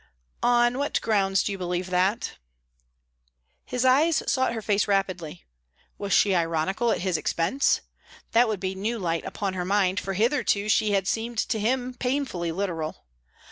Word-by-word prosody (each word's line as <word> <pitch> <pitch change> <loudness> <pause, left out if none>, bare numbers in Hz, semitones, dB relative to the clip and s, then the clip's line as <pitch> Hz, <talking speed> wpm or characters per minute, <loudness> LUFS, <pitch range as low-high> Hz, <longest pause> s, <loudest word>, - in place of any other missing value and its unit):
"On 240 +1 +3
what 285 - 0
grounds 195 -3 +2
do - - -2
you 195 - -5
believe 180 0 -3
that?" 185 +4 +1 1.3
His 250 0 -2
eyes 300 +6 +4
sought 260 -1 +1
her 225 - -4
face 205 -1 +1
rapidly. 185 -5 -2 0.5
Was 200 -1 -4
she 200 +1 +4
ironical 170 +6 0
at - - 0
his 185 -3 0
expense? 170 - +1 0.5
That 235 +1 +4
would 215 -3 -2
be 190 0 -2
new 215 +5 -2
light 170 -5 -2
upon 195 -2 -3
her 180 -1 -2
mind, 190 0 +1
for 195 - -4
hitherto 215 -1 +1
she 215 -1 +3
had 195 -2 +1
seemed 230 +2 -2
to 220 0 0
him 250 +3 0
painfully 250 -10 -2
literal. 165 - -4
200 Hz, 160 wpm, -26 LUFS, 185-240 Hz, 1.3 s, eyes